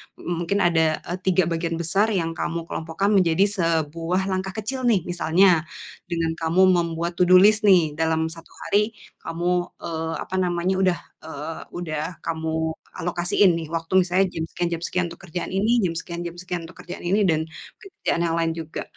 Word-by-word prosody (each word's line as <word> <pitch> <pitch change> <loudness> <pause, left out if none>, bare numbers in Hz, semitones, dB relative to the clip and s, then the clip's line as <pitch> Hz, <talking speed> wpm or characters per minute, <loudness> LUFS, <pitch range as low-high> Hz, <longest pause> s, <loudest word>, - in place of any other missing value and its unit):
m 175 -1 -4
mungkin 200 +4 +1
ada, 160 -2 +2
e - - -7
3 185 0 +4
bagian 165 0 -1
besar 170 +6 +1
yang 180 -7 0
kamu 170 0 -3
kelompokkan 165 +4 -2
menjadi 185 -3 +4
sebuah 165 +3 0
langkah 190 0 -2
kecil 250 +4 -2
nih. 205 -8 +3
Misalnya, 175 -1 +3 0.4
dengan 165 -2 -1
kamu 165 +3 +2
membuat 170 0 -1
to 180 - +4
do 185 - +7
list 210 +3 +6
nih, 175 -6 +5
dalam 160 0 +1
1 165 +1 -12 0.2
hari 210 +2 +1 0.2
kamu, 175 +2 -2 0.3
eee, 160 0 -3
apa 190 - -6
namanya, 175 0 0
udah, 185 -2 +2 0.3
eee, 160 +1 -6 0.2
udah 165 -1 -4
kamu, 160 0 -1 0.2
alokasiin 175 +2 +2
nih 165 -1 -4
waktu 165 0 -4
misalnya 185 +2 +2
jam 160 - -2
sekian 175 - -2
jam 170 -1 -3
sekian 180 +1 0
untuk 170 - -11
kerjaan 175 +2 -4
ini, 215 +5 +2
jam 175 -3 0
sekian 170 0 -6
jam 170 - -8
sekian 180 -1 -4
untuk 175 - -15
kerjaan 175 - -8
ini 200 +4 +3
dan 160 -2 +2
mungkin 275 - -14
pekerjaan 170 - 0
yang 165 -1 0
lain 165 0 +1
juga. 165 -1 -5
170 Hz, 185 wpm, -23 LUFS, 165-185 Hz, 0.4 s, do